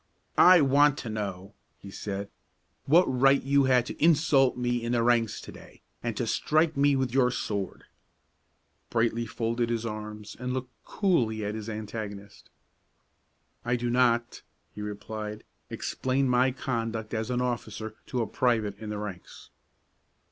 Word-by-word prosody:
"I 180 -2 +8
want 145 +1 +4
to 115 - -5
know," 100 -2 -5 0.2
he 100 - -11
said, 100 0 -5 0.6
"what 170 +6 +6
right 135 +2 +3
you 140 0 +3
had 125 -2 +3
to - - -5
insult 150 -5 +4
me 120 -1 -1
in 120 +1 -1
the 120 -1 +2
ranks 115 -2 +2
to - - -10
day, - - -15 0.2
and - - -3
to - - -1
strike 155 +1 +1
me 140 0 +3
with 130 -3 -1
your 130 -2 +4
sword?" 100 -5 -4 1.1
Brightly 115 0 0
folded 115 +1 -1
his 115 -1 -1
arms, 105 -1 -6
and 125 0 -3
looked 130 -1 -4
coolly 115 - 0
at 105 - -2
his 110 0 -6
antagonist. 105 -2 -7 1.1
"I 120 +1 0
do 120 0 -2
not," 120 -1 +2 0.3
he 105 - -8
replied, 105 +1 -6 0.3
"explain 130 +1 -1
my 125 +1 +3
conduct 115 -4 -3
as 110 0 -2
an 125 -1 0
officer 110 -3 -3
to 125 -2 -1
a - - -2
private 110 -4 0
in 110 - -7
the 105 - -3
ranks." 105 -4 -8
120 Hz, 155 wpm, -28 LUFS, 110-130 Hz, 1.1 s, I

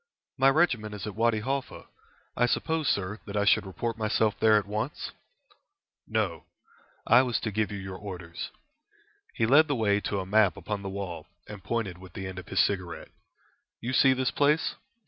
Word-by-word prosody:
"My 135 0 +5
regiment 125 -9 +1
is 105 - -6
at 105 - -5
Wady 115 0 +1
Halfa. 135 +3 -3 0.5
I 120 - +3
suppose, 160 +4 0
sir, 100 +2 0
that 100 0 -4
I 100 - +2
should 105 - +4
report 115 +4 -4
myself 110 0 +2
there 110 -1 +5
at 105 - 0
once?" 110 +7 -4 1.0
"No; - - -1 0.6
I 120 +2 +7
was 125 -3 0
to 110 - -2
give 105 0 0
you 100 - -4
your 95 -1 -6
orders." 90 -4 -7 0.9
He 115 - +2
led 145 +7 +6
the 145 - 0
way 105 -3 +2
to 100 - -2
a 95 - -4
map 100 -2 +3
upon 105 -2 -4
the 100 - -5
wall, 95 -5 -6 0.2
and 105 -3 -9
pointed 100 -6 -2
with 95 -2 -13
the 95 - -6
end 95 0 -6
of 90 - -11
his - - +2
cigarette. 90 -5 -2 0.7
"You 125 +2 -3
see 130 +1 +6
this 130 -1 0
place. 150 +2 +2
105 Hz, 185 wpm, -28 LUFS, 95-120 Hz, 1.0 s, I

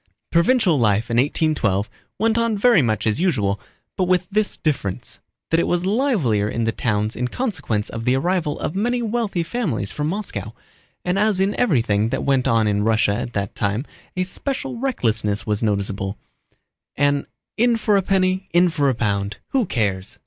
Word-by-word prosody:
Provincial 175 - +3
life 110 0 +1
in 115 - +1
1812 125 - +1 0.3
went 225 0 +2
on 230 -2 +1
very 230 -3 +5
much 110 -4 0
as 110 +8 +1
usual, 105 - +1 0.4
but 185 - +1
with 180 0 +1
this 215 +1 0
difference, 130 - -3 0.3
that 165 - +4
it - - +1
was 175 0 0
livelier 190 - +1
in 115 - -2
the 115 - +1
towns 105 -2 -1
in 125 - -1
consequence 145 - -2
of 115 0 -6
the 125 +2 +2
arrival 170 +1 0
of - - -2
many 240 +5 0
wealthy 220 -6 -1
families 165 - -2
from 150 0 -2
Moscow, 200 +6 -4 0.5
and 180 +2 +1
as 210 -2 +2
in 195 +2 +2
everything 115 - +2
that - - -2
went 135 -2 +2
on 115 -2 +3
in 105 0 +1
Russia 110 -1 +2
at 120 +3 -4
that 100 -1 -2
time 105 +6 -1 0.3
a 185 - +2
special 265 +7 -3
recklessness 115 - -1
was 105 -1 -1
noticeable, 100 -2 -1 0.8
an 145 0 +1 0.3
"in 235 +1 +3
for 215 -2 +2
a 195 - +4
penny, 190 0 +1
in 175 +1 +5
for 145 -3 +2
a 130 - 0
pound—who 105 - -1
cares?" 100 - -1
145 Hz, 175 wpm, -21 LUFS, -, 0.8 s, very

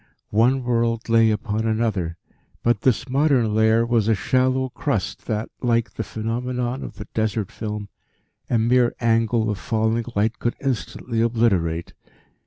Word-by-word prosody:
One 125 +5 +3
world 115 -1 0
lay 115 -1 +5
upon 110 0 -1
another, 105 -7 -1 0.5
but 120 -3 +2
this 125 0 +1
modern 130 -5 +2
layer 110 +1 +4
was 115 -3 +1
a 110 - +4
shallow 130 +5 +1
crust - - -3
that, 110 +1 -2
like 115 -2 +1
the 110 - -4
phenomenon 120 +3 -3
of - - -8
the - - -8
"desert 110 -2 -1
film," 105 -2 -5 0.6
a 120 - +2
mere 120 +2 +3
angle 115 -1 +2
of 100 - -4
falling 110 +1 0
light 110 +3 +1
could 120 - -1
instantly 125 -3 -2
obliterate. 100 -8 +1
115 Hz, 145 wpm, -23 LUFS, 110-120 Hz, 0.6 s, lay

